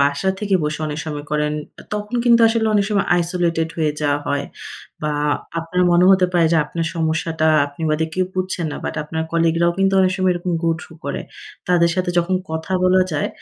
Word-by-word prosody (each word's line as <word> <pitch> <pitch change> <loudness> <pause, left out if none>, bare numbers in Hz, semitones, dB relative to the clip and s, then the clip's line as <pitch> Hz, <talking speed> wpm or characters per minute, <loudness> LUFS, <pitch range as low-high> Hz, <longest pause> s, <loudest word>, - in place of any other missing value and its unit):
বাসা 140 +7 +2
থেকে 200 -1 0
বসে 150 +1 -3
অনেক 150 0 -4
সময় 150 -1 -5
করেন। 150 0 0 0.4
তখন 210 +2 -5
কিন্তু 235 -1 +5
আসলে 225 -1 +1
অনেক 200 -1 +3
সময় 200 -1 +1
আইসোলেটেড 170 -2 0
হয়ে 155 -2 +1
যাওয়া 145 -1 +1
হয়। 145 0 -1 0.6
বা 150 - 0 0.5
আপনার 180 +2 -1
মনে 175 +1 +5
হতে 185 -1 +5
পারে, 170 -2 +3
যে - - +4
আপনার 165 +3 -3
সমস্যাটা 160 -1 0 0.2
আপনি 145 +3 -10
বাদে 160 +1 +1
কেউ 185 0 +1
বুঝছে 185 -1 -2
না। - - -5
বাট - - -3
আপনার 160 +1 -3
কলিগ 165 -1 +2
রাও 170 0 +3
কিন্তু 195 0 +2
অনেক 185 0 +3
সময় 185 -1 +2
এরকম 175 0 -3
গো 165 - +2
থ্রু - - -12
করে। - - -3 0.5
তাদের 170 -1 +4
সাথে 180 0 -1
যখন 180 +2 +1 0.2
কথা 160 +4 -4
বলা 185 0 +4
যায়, 150 - 0
170 Hz, 200 wpm, -20 LUFS, 160-185 Hz, 0.6 s, কিন্তু